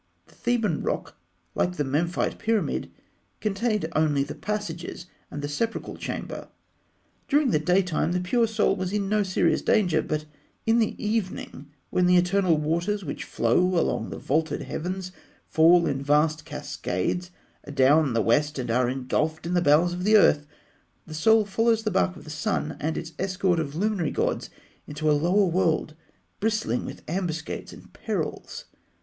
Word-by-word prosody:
The -, -, -22 dB
Theban 225 Hz, -9 st, 0 dB
rock, -, -, -3 dB, 0.4 s
like 180 Hz, 0 st, 0 dB
the 145 Hz, -, +1 dB
Memphite 155 Hz, +6 st, -1 dB
pyramid, 225 Hz, -2 st, 0 dB, 0.5 s
contained 210 Hz, -1 st, 0 dB
only 150 Hz, -3 st, +2 dB
the -, -, -6 dB
passages 175 Hz, -5 st, -5 dB, 0.2 s
and 145 Hz, -, -6 dB
the -, -, -1 dB
sepulchral 225 Hz, +11 st, -3 dB
chamber. -, -, -5 dB, 0.8 s
During 285 Hz, -3 st, +3 dB
the 155 Hz, -, +3 dB
daytime, 180 Hz, +1 st, +1 dB
the 180 Hz, -, +1 dB
pure 230 Hz, +6 st, +2 dB
Soul 220 Hz, -2 st, +1 dB
was 185 Hz, 0 st, -3 dB
in 205 Hz, -2 st, 0 dB
no 210 Hz, 0 st, +2 dB
serious 190 Hz, -2 st, +1 dB
danger; 180 Hz, -7 st, +2 dB
but 155 Hz, 0 st, -3 dB, 0.4 s
in 225 Hz, +1 st, +4 dB
the 220 Hz, -, +1 dB
evening, 205 Hz, -9 st, -3 dB, 0.2 s
when 180 Hz, -1 st, +3 dB
the 180 Hz, 0 st, +5 dB
eternal 180 Hz, -1 st, +3 dB
waters 170 Hz, +6 st, -1 dB
which 140 Hz, -, -5 dB
flow 115 Hz, +5 st, +1 dB, 0.2 s
along -, -, -1 dB
the -, -, -6 dB
vaulted 155 Hz, +2 st, -1 dB
heavens 185 Hz, +2 st, -4 dB, 0.3 s
fall 170 Hz, +2 st, +5 dB
in 135 Hz, -1 st, -1 dB
vast 150 Hz, +2 st, +2 dB
cascades 175 Hz, -, -3 dB, 0.4 s
adown 140 Hz, 0 st, +3 dB
the 115 Hz, -1 st, +2 dB
west 150 Hz, +7 st, +2 dB
and 125 Hz, -3 st, -2 dB
are 125 Hz, +1 st, +2 dB
engulfed 145 Hz, +5 st, -1 dB
in 170 Hz, -, -2 dB
the 175 Hz, -, +3 dB
bowels 165 Hz, +3 st, +4 dB
of 180 Hz, +1 st, -4 dB
the 215 Hz, +2 st, +6 dB
earth, 150 Hz, -7 st, +4 dB, 0.6 s
the 155 Hz, -, -9 dB
Soul 220 Hz, +7 st, +4 dB
follows 225 Hz, +2 st, +1 dB
the 215 Hz, -, -1 dB
bark 185 Hz, -1 st, +1 dB
of -, -, -12 dB
the 155 Hz, -, -9 dB
Sun 150 Hz, 0 st, -2 dB
and 160 Hz, +2 st, -2 dB
its 165 Hz, 0 st, -6 dB
escort 185 Hz, -2 st, +1 dB
of 145 Hz, -2 st, -3 dB
luminary 195 Hz, -3 st, 0 dB
gods -, -, -1 dB, 0.4 s
into 150 Hz, +1 st, 0 dB
a -, -, +5 dB
lower 175 Hz, +7 st, +3 dB
world 165 Hz, -3 st, +1 dB, 0.5 s
bristling 215 Hz, -, 0 dB
with -, -, -8 dB
ambuscades 165 Hz, -2 st, -3 dB
and -, -, -14 dB
perils. -, -, -4 dB
175 Hz, 165 wpm, -26 LUFS, 150-200 Hz, 0.8 s, the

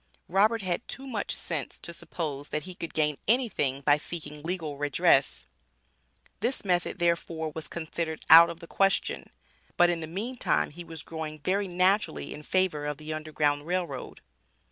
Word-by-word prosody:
Robert 210 Hz, +4 st, +3 dB
had 185 Hz, +4 st, -2 dB
too 270 Hz, -, -4 dB
much 230 Hz, -7 st, -2 dB
sense 150 Hz, -7 st, -4 dB
to 170 Hz, -, -7 dB
suppose 150 Hz, -4 st, -5 dB
that 150 Hz, -, -2 dB
he 185 Hz, -, -7 dB
could 170 Hz, -2 st, -7 dB
gain 150 Hz, -2 st, +1 dB
anything 205 Hz, -, +1 dB
by 145 Hz, +1 st, +4 dB
seeking 150 Hz, -2 st, -7 dB
legal 160 Hz, -3 st, -3 dB
redress. 145 Hz, -2 st, +3 dB, 0.9 s
This 235 Hz, +2 st, 0 dB
method, 180 Hz, -1 st, +1 dB
therefore, 170 Hz, -2 st, 0 dB
was 160 Hz, -1 st, -5 dB
considered 160 Hz, -1 st, -4 dB
out 165 Hz, +1 st, +10 dB
of 170 Hz, 0 st, -8 dB
the -, -, -8 dB
question. 195 Hz, +3 st, +1 dB, 0.5 s
But 175 Hz, 0 st, +6 dB
in 170 Hz, -, -2 dB
the 160 Hz, -, -5 dB
meantime 220 Hz, +7 st, -1 dB
he 175 Hz, +4 st, -8 dB
was 165 Hz, -2 st, -6 dB
growing 155 Hz, -1 st, -6 dB
very 195 Hz, +5 st, 0 dB
naturally 185 Hz, +3 st, +1 dB
in 150 Hz, -, -9 dB
favor 155 Hz, -3 st, 0 dB
of 150 Hz, -1 st, -3 dB
the 155 Hz, 0 st, -5 dB
Underground 150 Hz, -1 st, -1 dB
Rail 180 Hz, 0 st, +1 dB
Road. 135 Hz, -5 st, -8 dB
170 Hz, 165 wpm, -28 LUFS, 150-185 Hz, 0.9 s, out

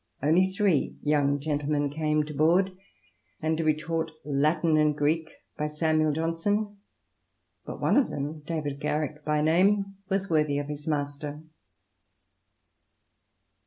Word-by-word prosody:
Only 170 Hz, +6 st, +4 dB
three 190 Hz, -6 st, +1 dB
young 145 Hz, -1 st, +2 dB
gentlemen 145 Hz, -1 st, -1 dB
came 155 Hz, 0 st, +1 dB
to 150 Hz, 0 st, -7 dB
board, 175 Hz, +6 st, +3 dB, 0.6 s
and 160 Hz, +1 st, 0 dB
to -, -, +1 dB
be 155 Hz, -1 st, +3 dB
taught 160 Hz, +1 st, -2 dB, 0.2 s
Latin 155 Hz, +3 st, +2 dB
and 150 Hz, -1 st, +3 dB
Greek 155 Hz, +2 st, +1 dB, 0.3 s
by 150 Hz, -, 0 dB
Samuel 155 Hz, 0 st, +1 dB
Johnson; 185 Hz, +7 st, -1 dB, 0.9 s
but -, -, -6 dB
one -, -, +2 dB
of 280 Hz, -, +3 dB
them, 145 Hz, +3 st, -4 dB
David 150 Hz, -2 st, -4 dB
Garrick 150 Hz, 0 st, -2 dB
by 150 Hz, 0 st, +1 dB
name, 195 Hz, +5 st, +2 dB
was 195 Hz, 0 st, 0 dB
worthy 150 Hz, -4 st, +1 dB
of 145 Hz, 0 st, -3 dB
his 150 Hz, +1 st, -7 dB
master. 145 Hz, 0 st, -3 dB
155 Hz, 130 wpm, -27 LUFS, 150-165 Hz, 0.9 s, Only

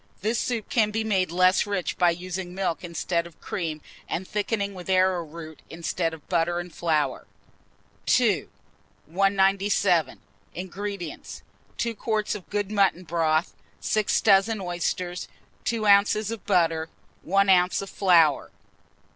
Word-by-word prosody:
This 220 Hz, +4 st, 0 dB
soup 235 Hz, -4 st, -2 dB
can 225 Hz, -6 st, +2 dB
be 220 Hz, +1 st, -2 dB
made 190 Hz, -5 st, 0 dB
less 185 Hz, +3 st, +3 dB
rich 200 Hz, -3 st, -2 dB
by 175 Hz, -1 st, +4 dB
using 180 Hz, +1 st, -4 dB
milk 185 Hz, -4 st, -2 dB
instead 170 Hz, 0 st, -2 dB
of 170 Hz, -, -19 dB
cream, 160 Hz, -4 st, -4 dB, 0.3 s
and 185 Hz, +2 st, -4 dB
thickening 205 Hz, -1 st, -2 dB
with 180 Hz, -1 st, -9 dB
arrowroot 170 Hz, -4 st, 0 dB
instead 165 Hz, 0 st, -2 dB
of 160 Hz, -2 st, -12 dB
butter 175 Hz, -1 st, +1 dB
and 175 Hz, -1 st, -6 dB
flour. 155 Hz, -6 st, -1 dB, 0.9 s
II. -, -, +1 dB, 0.6 s
197. 195 Hz, 0 st, +2 dB, 0.4 s
INGREDIENTS. 190 Hz, -1 st, -6 dB, 0.3 s
2 235 Hz, 0 st, -1 dB
quarts 215 Hz, -1 st, -1 dB
of 205 Hz, -4 st, -8 dB
good 205 Hz, -1 st, -2 dB
mutton 195 Hz, -3 st, +2 dB
broth, 165 Hz, 0 st, 0 dB, 0.3 s
6 215 Hz, -2 st, +1 dB
dozen 205 Hz, +1 st, +4 dB
oysters, 175 Hz, 0 st, -3 dB, 0.4 s
2 225 Hz, -2 st, -1 dB
oz. 205 Hz, +2 st, +4 dB
butter, 165 Hz, -4 st, +2 dB, 0.3 s
1 195 Hz, +3 st, +2 dB
oz. 180 Hz, +1 st, +3 dB
of 195 Hz, -, -8 dB
flour. 170 Hz, -7 st, +3 dB
185 Hz, 130 wpm, -25 LUFS, 170-200 Hz, 0.9 s, by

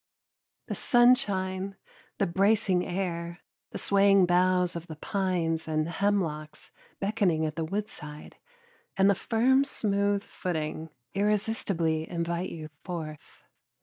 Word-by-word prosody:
The -, -, -4 dB
sunshine, 200 Hz, -6 st, +2 dB, 0.4 s
the -, -, +2 dB
bracing 195 Hz, 0 st, +2 dB
air, 175 Hz, -2 st, -3 dB, 0.3 s
the -, -, -6 dB
swaying 195 Hz, -1 st, +4 dB
boughs 180 Hz, 0 st, +2 dB
of 170 Hz, 0 st, -6 dB
the 160 Hz, -, -7 dB
pines 170 Hz, -2 st, -1 dB
and 155 Hz, 0 st, 0 dB
hemlocks 165 Hz, -5 st, -2 dB, 0.3 s
beckoning 195 Hz, -6 st, +1 dB
at 155 Hz, -1 st, -3 dB
the 165 Hz, -, -2 dB
woodside, 155 Hz, -6 st, -6 dB, 0.6 s
and 195 Hz, 0 st, +5 dB
the -, -, +4 dB
firm 245 Hz, +7 st, +3 dB
smooth 200 Hz, -6 st, 0 dB
footing, 160 Hz, -3 st, -4 dB, 0.2 s
irresistibly 195 Hz, -6 st, 0 dB
invite 170 Hz, +1 st, -2 dB
you 155 Hz, -2 st, -7 dB
forth. 160 Hz, -5 st, -7 dB
185 Hz, 115 wpm, -28 LUFS, 165-200 Hz, 0.6 s, and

